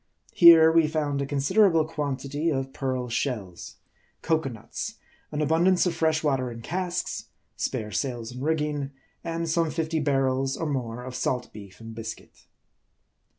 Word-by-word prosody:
Here, 165 -2 +8
we 165 -1 +4
found 150 -2 -1
a 140 - -2
considerable 160 +4 +3
quantity 145 0 -2
of 135 -3 -2
pearl 130 -2 -2
shells; 115 -7 -3 0.5
cocoanuts; 160 - -2 0.4
an 150 - -2
abundance 175 +5 +3
of 180 - +1
fresh 160 -1 +1
water 135 -4 +1
in 115 -1 -9
casks; 180 +2 -3 0.3
spare 105 -1 -3
sails 120 -3 -3
and 125 +1 -8
rigging; 150 -2 -1 0.3
and 165 0 -3
some 165 0 +1
fifty 160 0 -1
bar 140 -2 +2
rels 135 +1 0
or 165 - -1
more 125 -5 -3
of 130 0 -7
salt 125 0 -2
beef 100 -3 -12
and 115 0 -9
biscuit. 115 0 -9
145 Hz, 150 wpm, -26 LUFS, 125-160 Hz, 0.5 s, Here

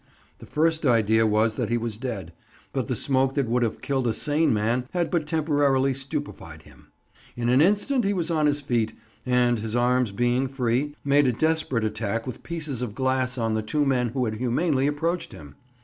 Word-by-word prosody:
The - - -12
first 160 +1 +1
idea 110 -4 +3
was 110 +1 +2
that - - -3
he 120 - +1
was 115 -2 -3
dead, 105 -10 -5 0.4
but - - -2
the - - -1
smoke 135 -1 +1
that 140 -4 0
would 125 +2 +1
have 115 -2 -2
killed 135 -3 0
a 110 - 0
sane 150 +2 +1
man 115 +4 0
had 175 -2 -1
but 165 -4 0
temporarily 145 -4 +2
stupefied 135 +1 -6
him. - - -19 0.4
In 120 0 -1
an 130 +3 +5
instant 210 - +2
he 200 - +1
was 175 -4 -1
on 155 -2 +2
his 145 0 0
feet, 115 -5 -1 0.3
and, 125 -2 +2
his 110 +1 -4
arms 125 -1 +2
being 120 +5 +1
free, 130 +2 -1
made 140 0 +4
a - - +3
desperate 155 -3 0
attack 110 +1 -2
with 125 -4 -7
pieces 155 -7 -5
of 115 -4 -4
glass 130 0 0
on 115 -2 0
the 110 - 0
two 145 +7 0
men 125 -3 +1
who 125 +1 -1
had 110 -1 -3
humanely 130 +4 +1
approached 165 +4 -2
him. 70 -3 -12
130 Hz, 200 wpm, -25 LUFS, 115-145 Hz, 0.4 s, an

